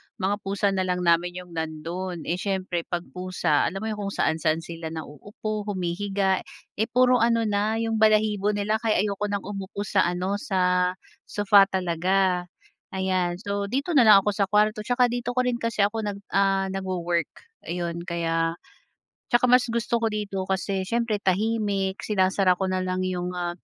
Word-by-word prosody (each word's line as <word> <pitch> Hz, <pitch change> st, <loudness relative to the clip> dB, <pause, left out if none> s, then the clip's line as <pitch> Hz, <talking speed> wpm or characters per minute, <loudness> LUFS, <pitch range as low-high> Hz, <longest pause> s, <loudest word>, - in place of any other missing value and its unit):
mga 200 Hz, +2 st, -1 dB
pusa 200 Hz, +1 st, 0 dB
na 185 Hz, -1 st, -1 dB
lang 180 Hz, 0 st, -1 dB
namin 175 Hz, +1 st, +2 dB
yung 180 Hz, -1 st, -8 dB
nandun. 165 Hz, +2 st, -4 dB
Eh, 175 Hz, +2 st, -2 dB
siyempre 185 Hz, -4 st, -2 dB
'pag 175 Hz, -1 st, -2 dB
pusa, 180 Hz, -5 st, 0 dB
alam 195 Hz, +2 st, -5 dB
mo 220 Hz, -, -2 dB
yung 210 Hz, -2 st, -4 dB
kung 200 Hz, -, -4 dB
saan-saan 160 Hz, 0 st, +1 dB
sila 165 Hz, -1 st, -7 dB
nauupo, 205 Hz, +7 st, -6 dB
humihiga. 195 Hz, +1 st, 0 dB, 0.4 s
Eh, 220 Hz, -, +2 dB
puro 250 Hz, +1 st, +4 dB
ano 230 Hz, 0 st, +3 dB
na, 210 Hz, 0 st, 0 dB
yung 225 Hz, -1 st, -1 dB
balahibo 210 Hz, -1 st, +3 dB
nila 210 Hz, +2 st, 0 dB
kaya 215 Hz, -4 st, +1 dB
ayoko 205 Hz, 0 st, -2 dB
ng 200 Hz, -1 st, -2 dB
umupo 200 Hz, 0 st, -5 dB
sa 195 Hz, -3 st, +2 dB
ano, 185 Hz, +3 st, -1 dB
sa 180 Hz, -5 st, +1 dB, 0.3 s
sofa 200 Hz, -1 st, +5 dB
talaga, 180 Hz, 0 st, +1 dB, 0.5 s
ayan. 185 Hz, -2 st, 0 dB
So, 200 Hz, +1 st, -3 dB
dito 275 Hz, -, -2 dB
na 260 Hz, -8 st, +5 dB
lang 200 Hz, -2 st, +8 dB
ako 210 Hz, -, +1 dB
sa 200 Hz, -1 st, 0 dB
kuwarto 210 Hz, +2 st, +2 dB
tsaka 245 Hz, +3 st, +2 dB
dito 245 Hz, 0 st, -3 dB
ko 255 Hz, -, +3 dB
rin 245 Hz, -1 st, -1 dB
kasi 230 Hz, -3 st, 0 dB
ako 210 Hz, +1 st, -1 dB
nag 200 Hz, 0 st, -5 dB
ah, 195 Hz, -1 st, +2 dB
nagwo-work, 175 Hz, -4 st, -1 dB, 0.4 s
ayon. 170 Hz, -1 st, -3 dB
Kaya 165 Hz, -1 st, 0 dB, 0.7 s
tsaka 240 Hz, -2 st, +2 dB
mas 250 Hz, 0 st, +5 dB
gusto 235 Hz, 0 st, 0 dB
ko 230 Hz, -, +1 dB
dito 200 Hz, -3 st, -3 dB
kasi 190 Hz, 0 st, -1 dB
siyempre 230 Hz, -2 st, 0 dB
tahimik. 200 Hz, -1 st, 0 dB
Sinasara 190 Hz, -2 st, +2 dB
ko 190 Hz, -, -3 dB
na 185 Hz, -, 0 dB
lang 185 Hz, 0 st, -1 dB
yung, 180 Hz, -1 st, -3 dB
ah, 175 Hz, -1 st, -2 dB
195 Hz, 170 wpm, -25 LUFS, 180-210 Hz, 0.7 s, lang